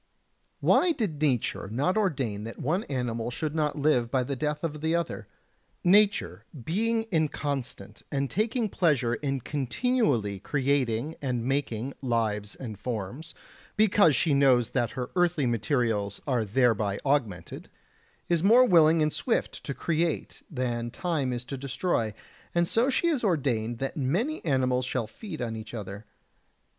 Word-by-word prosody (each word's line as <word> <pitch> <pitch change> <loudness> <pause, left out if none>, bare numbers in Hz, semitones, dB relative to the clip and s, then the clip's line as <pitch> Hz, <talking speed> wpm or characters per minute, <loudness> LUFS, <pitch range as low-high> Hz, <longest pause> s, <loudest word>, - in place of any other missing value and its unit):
67. - - -4
Why 360 - +5
did 180 - -3
nature 125 -9 0
not 145 +11 +1
ordain 135 - 0
that 115 +1 -7
one 175 - -1
animal 120 -3 -2
should 150 +5 -3
not 150 -2 0
live 140 -5 +2
by 130 +1 +1
the 140 +2 -3
death 150 +3 -2
of 150 -2 -3
the 160 +1 +1
other? 170 0 -3 0.6
Nature, 195 - +3 0.2
being 225 - 0
inconstant 145 -5 -2
and 140 -1 0
taking 225 - 0
pleasure 145 - +1
in 135 +1 -2
continually 140 - 0
creating 135 0 0
and 125 -4 -2
making 135 -2 -1
lives 110 -5 -1
and 110 -6 -7
forms, 120 - -5 0.4
because 205 -7 +5
she 160 -4 +2
knows 130 -4 +4
that 120 -3 +1
her 125 -1 -3
earthly 175 -5 +2
materials 115 -4 0
are 125 -5 0
thereby 110 -3 +2
augmented, 115 -12 -1 0.6
is 170 -1 +1
more 235 +6 +7
willing 165 -5 +5
and 150 - 0
swift 240 - -1
to 140 - -4
create 165 0 -1
than 120 -4 -2
time 145 -1 -1
is 125 0 -4
to 135 - -5
destroy; 130 -3 -1 0.4
and 170 0 +3
so 235 +8 +2
she 275 - +1
has 310 -8 +1
ordained 125 - 0
that 135 +3 -3
many 185 - -1
animals 130 -3 +1
shall 125 -2 -2
feed 155 - -7
on 115 -1 -3
each 110 +1 -8
other. 105 0 -7
140 Hz, 150 wpm, -27 LUFS, 120-165 Hz, 0.6 s, more